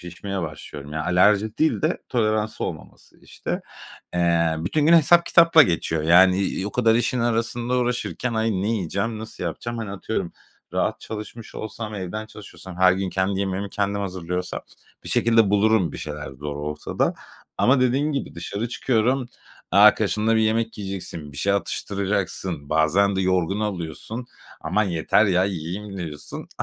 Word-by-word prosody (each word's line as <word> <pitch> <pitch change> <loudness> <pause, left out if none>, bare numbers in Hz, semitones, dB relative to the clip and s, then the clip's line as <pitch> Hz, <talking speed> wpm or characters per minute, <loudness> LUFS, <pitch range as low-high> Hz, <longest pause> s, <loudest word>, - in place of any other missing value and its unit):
şişmeye 90 +2 -5
başlıyorum. 75 -2 -8
Ya, 80 -1 -3
alerji 105 +4 +3
değil 160 - +2
de 155 +3 +1
toleransı 110 -3 0
olmaması 80 -4 -9
işte. - - -5 0.5
Eee, 85 -2 +2
bütün 145 - 0
gün 170 - +6
hesap 170 +1 +6
kitapla 165 -2 +7
geçiyor, 80 - 0
yani, 90 +3 +6
iii, 95 0 -1
o - - -5
kadar 115 -2 +3
işin 120 +1 +1
arasında 120 +1 0
uğraşırken, 125 0 -2
ay, 110 0 +1
ne 95 +2 -1
yiyeceğim, 110 +2 -2
nasıl 110 -4 -7
yapacağım? 115 +8 -4
Hani, 110 -3 -4
atıyorum 100 -2 -3 0.4
rahat - - -1
çalışmış 110 +1 -8
olsam, 110 0 -6
evden 105 +3 -5
çalışıyor 105 -2 -13
olsam, 95 -2 -10
her 95 0 +7
gün 95 -1 -2
kendi 95 +1 0
yemeğimi 95 +1 -2
kendim 100 0 -1
hazırlıyor 90 -2 -3
olsam, 90 0 -4 0.4
bir - - -7
şekilde 115 -3 +3
bulurum 105 -5 +3
bir - - -7
şeyler 75 -1 -6
zor 70 +2 -6
olsa 75 +1 -6
da - - +2 0.4
ama 130 +1 +4
dediğin 135 +4 +2
gibi 140 - -4
dışarı 100 +7 -4
çıkıyorum, 125 +1 0 0.4
e - - +2
arkadaşınla 110 +1 +5
bir - - +3
yemek 110 0 0
yiyeceksin, 95 -6 -6
bir 70 - -11
şey 100 +6 +1
atıştıracaksın, 95 -6 -2
bazen 90 +6 +2
de - - +1
yorgun 95 +2 +1
oluyorsun, 105 +5 -4 0.3
aman 95 +7 +1
yeter 90 +4 +2
ya, 90 -1 +3
yiyeyim 95 +2 -5
diyorsun. 75 -4 -7
100 Hz, 160 wpm, -23 LUFS, 90-115 Hz, 0.5 s, kitapla